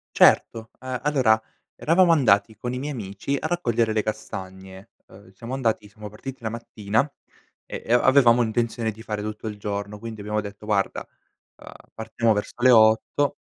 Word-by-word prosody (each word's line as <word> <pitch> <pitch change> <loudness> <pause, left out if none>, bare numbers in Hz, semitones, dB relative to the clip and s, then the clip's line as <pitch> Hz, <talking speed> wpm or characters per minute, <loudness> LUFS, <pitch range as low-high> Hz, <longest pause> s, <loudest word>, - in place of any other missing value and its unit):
Certo, 110 0 +4
ehm, 130 -1 -4
allora 130 -7 +3 0.3
eravamo 170 +2 +3
andati 110 -8 +3
con 125 0 -4
i 125 - -3
miei 145 +3 -4
amici 110 +3 -4
a - - -2
raccogliere 120 -10 0
le 110 -1 +1
castagne, 95 -3 -7 0.2
ehm, 95 0 -17
siamo 115 +6 -8
andati 115 -5 -1
siamo 105 +1 -10
partiti 125 +4 -9
la 110 - -1
mattina, 110 +2 -2 0.6
e - - -7
e 115 - +1
a 120 - +5
avevamo 125 -3 +5
intenzione 115 0 -1
di 110 +1 -13
fare 105 -2 -4
tutto 105 +1 -6
il 105 -1 -5
giorno, 100 0 -5
quindi 115 0 -8
abbiamo 105 +1 -2
detto: 105 +1 -10
"Guarda, 100 -2 -1 0.5
ehm, - - -13 0.2
partiamo 110 +1 0
verso 105 - -4
le 130 - +7
8" 110 +5 +4
110 Hz, 175 wpm, -24 LUFS, 105-125 Hz, 0.6 s, le